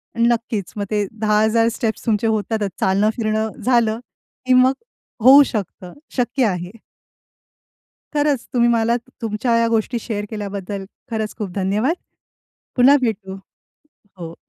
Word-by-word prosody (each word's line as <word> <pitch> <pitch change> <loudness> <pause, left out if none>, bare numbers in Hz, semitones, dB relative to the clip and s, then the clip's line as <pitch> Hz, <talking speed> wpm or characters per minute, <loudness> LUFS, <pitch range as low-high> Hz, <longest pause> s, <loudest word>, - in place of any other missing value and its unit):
आणि 235 0 +3
नक्कीच 230 -5 -1
मग 205 - -2
ते 210 -1 +1
10,000 220 +1 +3
स्टेप्स 225 -1 -3
तुमचे 225 -1 +1
होतातच 215 -1 -1
चालणं, 195 +3 +2
फिरणं 220 -1 -1
झालं 235 -3 +2 0.5
की 255 - +3
मग 255 +1 +5 0.5
होऊ 275 +3 +9
शकतं. 190 -6 -5 0.2
शक्य 245 +1 +1
आहे. 180 -3 -2 1.4
खरंच 290 -4 0
तुम्ही 240 -1 +3
मला 235 0 +2 0.3
तुमच्या 225 +2 -1
ह्या 230 0 +2
गोष्टी 230 +1 0
शेअर 210 -2 -4
केल्याबद्दल 200 -2 -5 0.3
खरंच 220 -1 -3
खूप 205 -3 -4
धन्यवाद. 205 - 0 0.8
पुन्हा 265 +3 +6
भेटू. 195 -5 -2 0.8
हो. 165 -1 -7
220 Hz, 130 wpm, -20 LUFS, 205-235 Hz, 1.4 s, होऊ